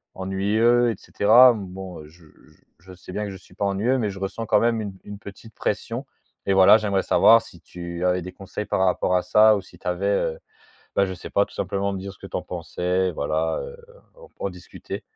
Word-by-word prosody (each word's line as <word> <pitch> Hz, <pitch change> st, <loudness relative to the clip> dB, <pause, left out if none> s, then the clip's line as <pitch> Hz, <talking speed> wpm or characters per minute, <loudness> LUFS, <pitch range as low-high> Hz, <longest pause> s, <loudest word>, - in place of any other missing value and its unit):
ennuyeux 110 Hz, +6 st, +2 dB
et -, -, -4 dB
cetera. 120 Hz, +4 st, +6 dB
Bon, 95 Hz, -5 st, -8 dB
je 80 Hz, +2 st, -19 dB, 0.5 s
je 95 Hz, +2 st, -14 dB
sais 90 Hz, 0 st, -12 dB
bien 105 Hz, +2 st, -2 dB
que 100 Hz, -, -5 dB
je 95 Hz, -, -8 dB
suis 90 Hz, -, -20 dB
pas 100 Hz, -, -1 dB
ennuyeux, 105 Hz, +7 st, +1 dB
mais 110 Hz, -5 st, -1 dB
je 95 Hz, -1 st, -8 dB
ressens 100 Hz, +4 st, -4 dB
quand -, -, +4 dB
même, 115 Hz, -1 st, +1 dB
une 100 Hz, -2 st, -5 dB
une 105 Hz, 0 st, -8 dB
petite 105 Hz, +3 st, -12 dB
pression 115 Hz, +5 st, -3 dB, 0.4 s
et 100 Hz, -, +3 dB
voilà, 95 Hz, +3 st, +7 dB
j'aimerais 100 Hz, -3 st, 0 dB
savoir 115 Hz, 0 st, +6 dB
si 100 Hz, -6 st, -15 dB
tu 85 Hz, 0 st, -6 dB
avais 90 Hz, 0 st, +2 dB
des 90 Hz, +2 st, -7 dB
conseils 100 Hz, +3 st, -6 dB
par 95 Hz, -, +1 dB
rapport 90 Hz, 0 st, +1 dB
à 90 Hz, -, +2 dB
ça? 110 Hz, 0 st, +5 dB
Ou 100 Hz, -, -5 dB
si -, -, -18 dB
tu -, -, -9 dB
avais, 90 Hz, +2 st, -1 dB
heu, 100 Hz, -5 st, 0 dB, 0.6 s
bah, 100 Hz, -, +4 dB
je 95 Hz, -, -5 dB
sais 90 Hz, -, -10 dB
pas, 100 Hz, -, +3 dB
tout -, -, -18 dB
simplement 100 Hz, +1 st, -2 dB
me 95 Hz, -, -4 dB
dire 100 Hz, +1 st, -7 dB
ce 95 Hz, -, -20 dB
que -, -, -10 dB
tu -, -, -4 dB
en -, -, -3 dB
pensais, 90 Hz, +1 st, -2 dB
voilà 80 Hz, +2 st, -1 dB
heu, 480 Hz, -, -9 dB, 0.4 s
en -, -, -14 dB
p -, -, -39 dB
en -, -, -2 dB
discuter. -, -, -9 dB
100 Hz, 235 wpm, -23 LUFS, 90-110 Hz, 0.6 s, voilà